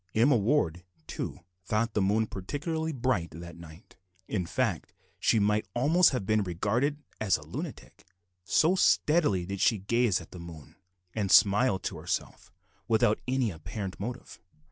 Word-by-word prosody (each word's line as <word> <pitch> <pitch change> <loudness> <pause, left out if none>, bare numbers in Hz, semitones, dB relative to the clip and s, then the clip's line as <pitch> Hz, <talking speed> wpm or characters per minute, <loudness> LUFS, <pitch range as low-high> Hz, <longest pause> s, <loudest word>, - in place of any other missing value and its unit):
Emma 125 +5 +5
Ward, 100 - +1 0.2
too, - - -5 0.2
thought 110 +3 -1
the 105 - +1
moon 105 +3 +2
particularly 160 - -3
bright 125 - -1
that 85 +2 -10
night; 85 +2 -14 0.3
in 90 -5 -2
fact - - -2 0.2
she - - +3
might 105 +1 +1
almost 155 +9 +5
have 125 -8 -3
been 110 +1 +2
regarded 115 - -1 0.2
as 105 -3 +2
a - - -12
lunatic; - - -8 0.4
so 155 - +3
steadily 150 - +3
did 100 +1 -5
she 115 - +4
gaze 110 +1 +1
at - - -13
the 90 - -9
moon, 85 -3 -11 0.4
and 100 -3 -1
smile 105 +1 +5
to - - -5
herself - - -4 0.4
without 110 -1 +3
any 130 -4 +1
apparent 95 +4 -6
motive. 120 +5 -6
105 Hz, 150 wpm, -29 LUFS, 95-125 Hz, 0.4 s, Emma